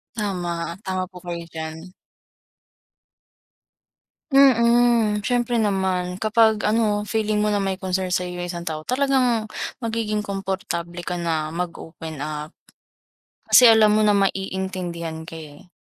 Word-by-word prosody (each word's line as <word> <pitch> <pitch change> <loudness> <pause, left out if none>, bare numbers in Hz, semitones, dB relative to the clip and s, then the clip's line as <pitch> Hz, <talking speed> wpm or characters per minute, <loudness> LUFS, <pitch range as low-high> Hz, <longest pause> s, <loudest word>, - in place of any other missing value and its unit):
Tama, 175 -5 -3
tama 185 -1 -1
po 180 - -13
kayo 170 -1 -4
diyan. 160 +2 -7 2.4
Mm, 235 -5 +4
siyempre 240 -1 +1
naman. 190 -3 0
Kapag 220 0 +3
ano 210 -1 +1
feeling 215 -1 0
mo 210 - +1
na 205 - +1
may 195 -1 -1
concern 185 0 -2
sa'yo 180 0 -1
yung 175 - -3
isang 175 -1 -5
tao, 155 -1 -4
talagang 255 -4 +1 0.3
magiging 220 -2 -1
komportable 190 -3 -4
ka 180 - -3
na 160 -2 -1
mag 175 +1 -3
open-up. 155 -2 -7 1.0
Kasi - - +7
alam 220 -1 +6
mo 215 - +3
na 210 -1 +4
maiintindihan 185 -4 -2
ka 165 - -7
eh. 160 +4 -12
190 Hz, 125 wpm, -23 LUFS, 170-215 Hz, 2.4 s, Kasi